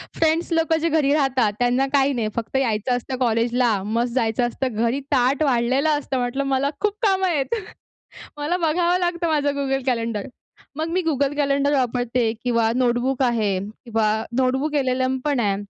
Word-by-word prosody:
Friends 325 +2 +1
लोकं 325 0 +2
जे 330 +1 0
घरी 300 -3 +2
राहतात 265 -7 +1
त्यांना 245 +2 +2
काही 280 0 +3
नाही. 235 -4 -1
फक्त 235 +2 -4
यायचं 245 -1 0
असतं 255 +2 -5
कॉलेजला, 235 -2 +1
मस्त 235 +3 -1
जायचं 240 -1 +1
असतं. 255 +1 -3
घरी 235 +4 0
ताट 265 +3 +2
वाढलेलं 265 +2 +2
असतं. 275 -2 -3
म्हटलं, 245 +3 -1
"मला 270 +1 +1
खूप 420 -1 +1
कामं 380 -2 +2
आहेत. 315 - 0 0.8
मला 300 +4 -1
बघावं 345 +1 +1
लागतं 345 -1 -1
माझं 295 -2 +1
Google 270 -1 -1
Calendar." 230 -4 -2 0.5
मग 315 +2 -2
मी 370 +1 +1
Google 280 -1 0
Calendar 280 0 +1
वापरते 245 -3 0
किंवा 230 -2 +2
Notebook 250 +2 +1
आहे 220 -6 +1
किंवा 220 +2 -2 0.3
NotebookLM 260 -1 0
पण 290 -4 +1
आहे. 200 -3 +1
260 Hz, 160 wpm, -22 LUFS, 235-290 Hz, 0.8 s, काही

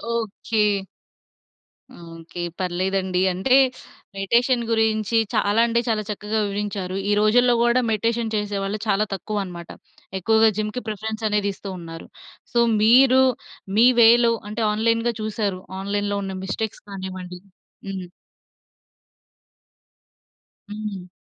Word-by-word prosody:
Okay. 225 0 -2 1.5
Okay. 165 +1 -8 0.2
పర్లేదండి 185 0 -1
అంటే, 190 +9 +2 0.6
meditation 235 +5 +2
గురించి 220 0 +1 0.2
చాలా 215 0 +2
అంటే 235 0 +1
చాలా 215 -2 0
చక్కగా 210 +1 -2
వివరించారు. 200 -2 -3
ఈ - - +2
రోజుల్లో 245 +3 +4
కూడా 240 +1 +3
మెడిటేషన్ 230 +1 -1
చేసేవాళ్ళు 205 0 -2
చాలా 205 +1 +2
తక్కువన్నమాట. 190 -3 -5 0.5
ఎక్కువగా 220 +3 +4
జిమ్‌కి 215 +4 -3
ప్రిఫరెన్స్ 220 +1 -5
అనేది 205 -1 0
ఇస్తున్నారు. 175 -5 -8 0.5
సో, 240 - +3 0.2
మీరు 255 +3 +6 0.6
మీ 235 +3 +7
వేలో 235 +1 +6 0.2
అంటే, 215 +2 -3
ఆన్‌లైన్‌గా 230 +2 +1
చూసారు. 210 -3 -2 0.2
ఆన్‌లైన్‌లో 205 +1 -2
ఉన్న 190 -1 -5
మిస్టేక్స్ 215 +2 -4
కానివ్వండి, 185 -2 -7 0.5
హ్మ్. 190 -2 -6 2.6
హ్మ్. 205 -3 -6
210 Hz, 100 wpm, -22 LUFS, 195-225 Hz, 2.6 s, మీ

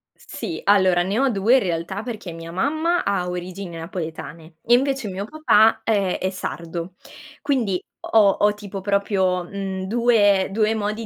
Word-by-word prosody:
Sì, 335 - -7
allora 190 -3 +4
ne 200 +6 -1
ho 270 -1 +3
2 220 +4 +3
in - - +6
realtà, 180 +3 -3
perché 220 -7 -6
mia 165 0 -9
mamma 315 - 0
ha 185 -3 -1
origini 180 0 -6
napoletane 165 -1 -7
e 240 - +3
invece 270 -2 +2
mio 190 +2 -4
papà, 225 -6 +3
ehm, 200 -5 +1
è 185 - -2
sardo 170 -1 -6 0.5
quindi 240 -10 0 0.2
ho 215 -3 +4
ho 210 0 +4
tipo 200 -2 -7
proprio, 190 -2 0
mhmm, 190 0 -5
2- 205 -4 +3
2 215 +2 +1
modi 215 +1 -3
200 Hz, 155 wpm, -22 LUFS, 180-225 Hz, 0.5 s, in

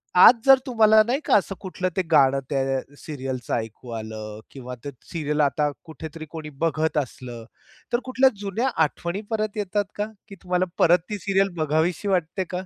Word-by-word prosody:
आज 180 - +10
जर 270 0 +9
तुम्हाला 220 -3 +5
नाही 265 +4 +1
का - - +4
असं 195 -1 +1
कुठलं 185 -1 -3
ते - - +4
गाणं 135 -2 +5
त्या 135 -1 0 0.2
सीरियलच 130 -5 -6
ऐकू 115 +2 -4
आलं 110 -1 -7
किंवा 125 -2 -8
ते 145 - -4 0.2
सीरियल 150 -2 -1
आता 145 +1 +2 0.2
कुठेतरी 160 +1 -8
कोणी 155 -2 -7
बघत 160 -1 0
असलं, 125 -4 -4 0.5
तर 240 - +3
कुठल्या 260 +1 +4
जुन्या 205 +6 -1 0.2
आठवणी 170 +6 -3
परत 215 -1 -2
येतात 205 0 0
का, 210 - -1 0.2
की 200 - -10
तुम्हाला 180 0 +1
परत 175 +1 +5
ती 210 - -2
सीरियल 195 +1 +2
बघावीशी 160 +6 0
वाटते 185 0 0
का? 180 - -14
165 Hz, 170 wpm, -24 LUFS, 140-200 Hz, 0.5 s, आज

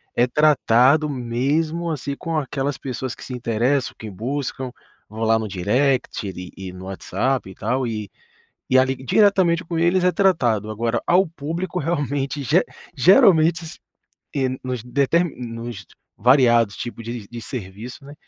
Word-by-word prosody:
é 120 - +3
tratado 145 +1 +4
mesmo, 145 +7 -1
assim, 145 -3 -3
com 165 -2 -3
aquelas 140 -1 -2
pessoas 130 -1 -5
que - - -12
se 130 - -7
interessam, 125 +3 0
que 110 - -8
buscam, 130 +5 -4 0.4
vão 110 +2 -8
lá 110 0 +3
no 110 - -3
direct 105 +2 0 0.2
e 95 -1 -7
no 95 0 -10
WhatsApp, 115 +5 -2
e 95 - -11
tal, 130 0 -1
e 105 -3 -4 0.6
e 130 - +5
ali, 130 0 +3
diretamente 180 - +3
com 165 +1 -4
eles, 175 +2 +2
é 180 - +4
tratado. 120 - +2
Agora 115 +2 -1
ao 185 +3 +4
público 165 +4 -4
realmente 145 -3 -2
ge 160 +8 +4 0.3
geralmente 165 +2 +5
s 160 - -10 0.6
eh, 135 -2 +1
nos 125 -3 -4
deter 140 +7 +2
nos 115 -4 -7 0.3
variados 120 -3 +4
tipos 120 -1 -6
de 115 -2 -6
de 120 +1 -8
serviço, 115 +3 -8
né, 145 - -10
130 Hz, 150 wpm, -22 LUFS, 115-155 Hz, 0.6 s, e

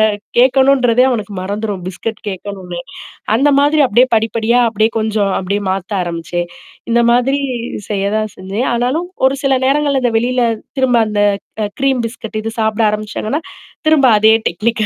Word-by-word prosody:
அ 205 - -15 0.2
கேட்கணுன்றதே 255 -1 +4
அவனுக்கு 215 -5 -3
மறந்துரும். 205 0 -4
பிஸ்கட் 210 +4 -5
கேட்கணுனே. 190 -2 -6 0.6
அந்தமாதிரி 285 +3 +3
அப்பிடியியே 250 +1 +4
படிப்படியா 225 +2 +1
அப்பிடியே 220 0 +1
கொஞ்சம் 215 -2 0
அப்பிடியே 200 +2 -2
மாத்த 190 0 -3
ஆரம்பிச்சேன். 175 0 -3 0.4
இந்தமாதிரி 240 +4 +3 0.5
செய்ய 200 -2 -1
தான் 215 -1 -2
செஞ்சேன். 195 +6 -3
ஆனாலும் 255 +9 -1 0.2
ஒரு 270 +1 -1
சில 270 -1 +3
நேரங்கள்ல 280 0 +1
அந்த 240 -2 +1
வெளியில 245 +2 +1 0.4
திரும்ப 250 -3 +3
அந்த 210 -1 -1 0.4
க 210 - -1
க்ரீம் 270 -2 +2
பிஸ்கட் 225 -2 -7
இது 225 - -3
சாப்பிட 220 +1 0
ஆரம்பிச்சாங்கன்னா, 215 +6 -3 0.5
திரும்ப 305 -4 +5
அதே 220 +1 +6
டெக்னிக்கா 215 +5 -1
225 Hz, 140 wpm, -16 LUFS, 205-255 Hz, 0.6 s, அதே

